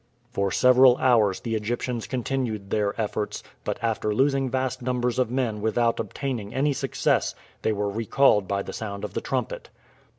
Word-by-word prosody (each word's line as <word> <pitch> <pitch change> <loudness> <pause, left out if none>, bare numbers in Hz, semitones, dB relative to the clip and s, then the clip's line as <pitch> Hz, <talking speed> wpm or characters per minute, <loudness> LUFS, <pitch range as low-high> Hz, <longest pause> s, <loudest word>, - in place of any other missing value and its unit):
For 100 -1 0
several 125 +2 +6
hours 115 -7 +3
the 115 - -3
Egyptians 115 +2 -2
continued 120 -6 -3
their 105 0 0
efforts, 105 -1 -2 0.2
but - - -2
after 110 -2 0
losing 135 +1 +2
vast 130 0 -2
numbers 125 -1 -1
of 125 -3 +2
men 120 -4 -1
without 115 +2 +1
obtaining 120 -7 -4
any 140 +2 +2
success - - 0 0.3
they - - +1
were 105 -1 -1
recalled 105 0 +2
by 100 0 -1
the - - -7
sound 100 -2 -5
of - - -5
the - - -2
trumpet. - - -3
115 Hz, 165 wpm, -25 LUFS, 105-130 Hz, 0.3 s, several